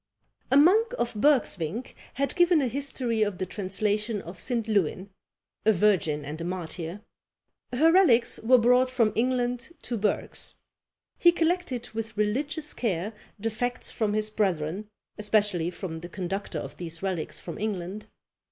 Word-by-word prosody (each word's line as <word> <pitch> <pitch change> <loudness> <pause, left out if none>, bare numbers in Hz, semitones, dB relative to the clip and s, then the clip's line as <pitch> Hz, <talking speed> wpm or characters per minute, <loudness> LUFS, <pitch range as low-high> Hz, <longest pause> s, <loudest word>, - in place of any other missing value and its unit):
A 270 - +6
monk 435 +11 +5
of 240 - -1
Bergsvinck 225 - +1 0.2
has 275 +2 +1
given 350 -2 +4
a 270 - +1
history 250 -3 -1
of 205 -3 +1
the 185 - -2
translation 210 +3 -1
of 175 0 -10
St. 235 -4 -1
Lewin, 195 -2 0 0.5
a 220 - +5
virgin 170 -7 +2
and 155 +3 -6
a - - -3
martyr: 175 +1 -5 0.7
her 305 +7 +4
relics 255 -11 +4
were 255 +3 +5
brought 250 +2 +4
from 235 -4 +2
England 245 +3 0
to 235 - -2
Bergs. 205 +1 0 0.6
He 345 - +7
collected 335 -8 -1
with 225 -1 -5
religious 285 +9 0
care 205 -2 -2 0.2
the 225 +2 -2
facts 245 +3 -2
from 215 -3 -1
his 215 0 +1
brethren, 190 -1 -1 0.3
especially 205 -5 +1
from 175 -2 -6
the 175 +1 -9
conductor 195 +2 -4
of - - -6
these 165 0 -6
relics 185 -5 -3
from 170 - -7
England. 205 0 -4
215 Hz, 150 wpm, -27 LUFS, 185-250 Hz, 0.7 s, He